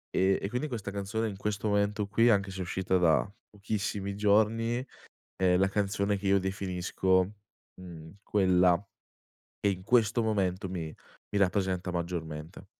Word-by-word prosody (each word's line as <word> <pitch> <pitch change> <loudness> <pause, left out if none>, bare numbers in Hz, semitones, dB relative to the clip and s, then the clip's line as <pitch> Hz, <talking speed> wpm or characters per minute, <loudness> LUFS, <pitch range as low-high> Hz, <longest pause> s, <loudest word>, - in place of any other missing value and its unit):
ehm, 95 +1 +3
e 100 - -3
quindi 125 +6 -2
questa 110 -7 -5
canzone 100 +3 -2
in 100 - -8
questo 105 +1 -2
momento 100 0 +1
qui 115 +3 +3
anche 100 -3 +2
se 95 - -7
è - - -2
uscita 95 +1 0
da 85 -3 +3 0.2
pochissimi 100 -1 -3
giorni 110 +4 +2 0.5
è 90 -1 +3
la 95 +1 +3
canzone 100 0 0
che 100 0 -4
io 100 0 +4
definisco, 95 -1 0 0.5
mhmm, 85 0 -11
quella 90 -3 +3 0.8
che 100 - +2
in 90 -1 -6
questo 115 +1 +3
momento 95 -3 0
mi 80 -4 -5 0.4
mi 105 - -1
rappresenta 95 -1 0
maggiormente. 85 0 -5
100 Hz, 150 wpm, -29 LUFS, 90-105 Hz, 0.8 s, io